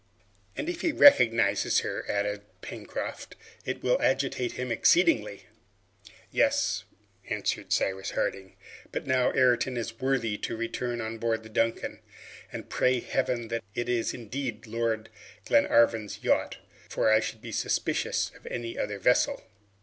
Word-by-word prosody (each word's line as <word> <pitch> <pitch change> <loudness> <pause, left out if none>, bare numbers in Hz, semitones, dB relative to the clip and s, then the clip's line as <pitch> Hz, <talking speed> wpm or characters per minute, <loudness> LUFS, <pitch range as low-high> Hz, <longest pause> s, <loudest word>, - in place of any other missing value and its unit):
"And 295 - -3
if 350 -1 -3
he 340 - +1
recognizes 115 - +5
her," - - -4
added 105 0 -1 0.2
Pencroft, - - -6 0.3
"it - - -4
will 125 - +2
agitate 130 -2 0
him 125 -1 -4
exceedingly!" 115 - +3 0.9
"Yes," - - +1 0.4
answered - - -2
Cyrus 95 0 0
Harding; 95 -1 -3 0.4
"but - - -4
now 130 -1 +2
Ayrton 125 0 +3
is 115 -1 -5
worthy 130 -6 0
to - - -3
return 120 +1 -3
on 110 0 -5
board 115 -1 -1
the 110 - -11
'Duncan,' 115 +1 -1 0.5
and - - -7
pray 125 0 +2
Heaven 120 -2 -1
that 115 0 -2
it 120 - -2
is 120 -2 0
indeed 120 -1 -5
Lord 115 -1 -2 0.4
Glenarvan's 115 -3 +3
yacht, - - +1 0.3
for 110 - +2
I 110 - +6
should 110 +1 -5
be 115 - -7
suspicious - - 0
of - - -14
any 115 -1 -5
other 105 -1 -2
vessel. 125 +6 +2
115 Hz, 140 wpm, -28 LUFS, 110-125 Hz, 0.9 s, I